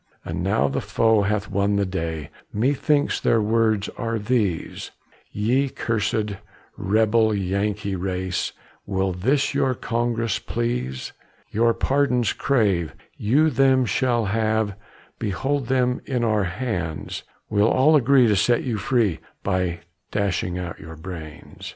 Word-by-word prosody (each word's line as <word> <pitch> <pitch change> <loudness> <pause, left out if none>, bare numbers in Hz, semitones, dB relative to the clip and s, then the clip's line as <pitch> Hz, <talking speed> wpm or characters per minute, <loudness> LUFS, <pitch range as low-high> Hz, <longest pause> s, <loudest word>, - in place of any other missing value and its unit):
And - - -3
now 70 +3 +2
the 70 - -2
foe 110 -2 +2
hath 100 +1 0
won 100 0 +1
the 100 0 +2
day, 80 -5 -4 0.2
Methinks 145 +6 +1
their 115 - +3
words 110 -1 +2
are 115 -1 -1
these: 105 -6 -1 0.4
"Ye 125 +7 +1
cursed, 105 -3 -1 0.4
rebel, 110 +2 +2
Yankee 100 +1 -1
race, 95 0 -2 0.4
Will 95 -1 0
this 130 +13 +1
your 135 -2 +1
Congress 115 -1 -1
please? 115 - -3 0.4
"Your 115 +1 +2
pardons 130 -4 +1
crave, 100 - +1 0.2
you 145 +9 +3
them 130 -2 +4
shall 120 +1 +1
have, 110 0 0 0.5
Behold 130 +6 -1
them 125 -1 +1
in 125 -3 0
our 110 -3 +2
hands; 90 -5 -3 0.3
We'll 105 +2 +4
all 150 +5 +4
agree 135 -2 +5
to 105 -2 +3
set 115 +5 +2
you 115 -5 -2
free, 115 -7 +1 0.2
By 90 -3 -1 0.3
dashing 95 -3 -1
out 90 -2 -5
your 80 +1 -9
brains. 80 -2 -9
110 Hz, 130 wpm, -23 LUFS, 95-125 Hz, 0.5 s, agree